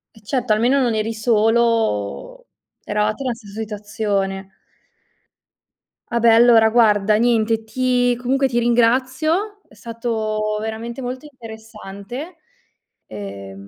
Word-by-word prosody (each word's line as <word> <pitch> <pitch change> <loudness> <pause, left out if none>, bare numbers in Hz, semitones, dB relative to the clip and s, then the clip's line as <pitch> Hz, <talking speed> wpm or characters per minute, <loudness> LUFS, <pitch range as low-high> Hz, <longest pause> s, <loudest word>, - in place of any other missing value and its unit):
Eh 220 - -18
certo. 245 -1 0
Almeno 245 +6 +2
non 235 -3 +1
eri 220 +1 -1
solo, 225 - 0 0.4
eravate 210 +3 -1
nella 250 -3 -2
stessa 215 -2 -11
situazione. 205 -3 -3 1.6
Ah 235 - -1
beh, 230 -1 +5
allora, 230 -1 +6
guarda, 215 -3 +3
niente 225 -1 +1
ti 245 +1 +1
comunque 265 +3 0
ti 240 -2 -3
ringrazio, 260 - +1
è - - -21
stato 215 -1 -3
veramente 225 +3 -5
molto 255 +3 -6
interessante, 220 - -10 0.7
ehm 100 -1 -9
225 Hz, 110 wpm, -20 LUFS, 215-245 Hz, 1.6 s, allora